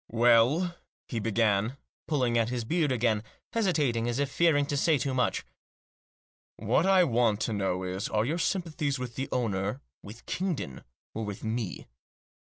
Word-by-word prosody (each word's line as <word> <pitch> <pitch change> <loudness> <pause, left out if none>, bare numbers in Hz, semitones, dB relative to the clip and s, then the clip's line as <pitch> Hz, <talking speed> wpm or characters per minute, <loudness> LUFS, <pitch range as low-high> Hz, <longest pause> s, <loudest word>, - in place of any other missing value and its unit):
" - - -74 0.2
Well," 135 +10 +4 0.3
he 115 - -3
began, 110 +2 +1 0.3
pulling 130 -6 +1
at 115 -1 +2
his 125 -1 -2
beard 155 +1 +1
again, 115 -4 +1 0.3
hesi 220 -5 +2
tating, 120 -8 0
as 120 0 -1
if 140 -1 -1
fearing 155 -3 +3
to 145 - -2
say 150 +2 +3
too 135 0 -2
much. 125 -1 0 0.6
" - - - 0.2
What 170 - +1
I 190 -1 +6
want 115 -7 +2
to 115 - -1
know 95 -2 -1
is, 95 +2 -3
are 105 +1 +1
your 160 +7 -1
sympathies 165 -6 -1
with 125 -2 -5
the 135 +3 -4
owner, 105 -1 -1 0.2
with 110 +4 -12
Kingdon, 170 - -3 0.3
or 110 - -3
with 105 -2 -6
me?" 110 -3 -3
120 Hz, 175 wpm, -29 LUFS, 110-150 Hz, 0.6 s, I